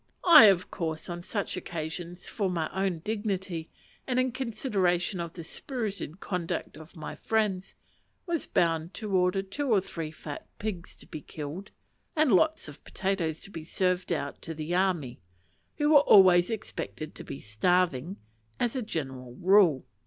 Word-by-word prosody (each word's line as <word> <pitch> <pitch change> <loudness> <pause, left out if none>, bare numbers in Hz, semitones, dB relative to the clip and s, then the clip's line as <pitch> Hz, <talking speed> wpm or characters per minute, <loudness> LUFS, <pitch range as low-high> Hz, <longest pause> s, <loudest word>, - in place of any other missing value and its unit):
I, 340 -10 +11
of 190 -3 +4
course, 160 -2 -3
on 175 0 -5
such 200 +3 -3
occasions, 175 0 -5
for 200 -4 -1
my 165 -3 -2
own 190 -4 -1
dignity, 195 -6 -3 0.4
and 255 -1 +1
in 255 0 +1
consideration 205 -7 0
of 170 -1 -4
the 170 - -8
spirited 205 - -5
conduct 180 -7 -3
of 160 +4 -13
my 155 -2 -6
friends, 205 -4 -1 0.5
was 340 -4 -2
bound 165 0 +1
to 210 -4 -3
order 180 +1 +2
two 270 +9 -3
or 210 - +6
three 165 -4 -5
fat 150 -1 -8
pigs 195 -5 -5
to - - -16
be 155 -3 -8
killed, 155 +8 -7 0.5
and 310 -4 +3
lots 315 - +3
of 145 0 -12
potatoes 180 -5 -2
to 195 - -11
be 165 -4 -7
served 180 +2 0
out 140 -4 -3
to 165 - -6
the 155 +2 -4
"army;" 175 -9 0 0.6
who 295 0 +2
were 295 - +9
always 185 -9 +7
expected 195 -7 -5
to - - -8
be 135 - -7
starving, 170 - +1 0.4
as 240 +2 0
a 260 - -1
general 130 - -5
rule. 180 -5 +4
180 Hz, 160 wpm, -28 LUFS, 160-205 Hz, 0.6 s, I